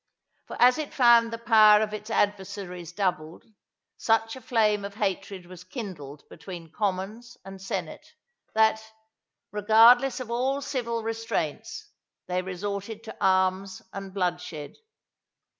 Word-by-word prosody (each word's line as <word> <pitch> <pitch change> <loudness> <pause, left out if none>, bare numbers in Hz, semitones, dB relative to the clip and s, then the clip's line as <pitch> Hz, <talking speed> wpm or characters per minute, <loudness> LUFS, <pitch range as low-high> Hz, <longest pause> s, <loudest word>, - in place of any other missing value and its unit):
For - - -8
as 250 +4 +5
it 305 - -5
found 235 -2 +5
the 230 - -4
power 220 -2 +6
of 215 0 -2
its 215 +1 -7
adversaries 195 -5 -2
doubled, 170 -4 -3 0.5
such 225 +1 +1
a 260 - -10
flame 215 -4 +1
of 200 0 -7
hatred 195 -2 -3
was 180 0 -12
kindled 180 - -8
between 170 -4 -10
commons 210 +6 -4
and 195 0 -10
senate, 195 - -5 0.5
that, 220 0 +3 0.7
regardless 225 +6 +5
of 245 -2 -6
all 260 +4 0
civil 240 -5 -3
restraints, 225 - -4 0.4
they 180 0 -1
resorted 200 +4 -5
to 225 - -10
arms 190 0 +1
and 195 -1 -7
bloodshed. 175 -5 -3
205 Hz, 125 wpm, -26 LUFS, 185-230 Hz, 0.7 s, power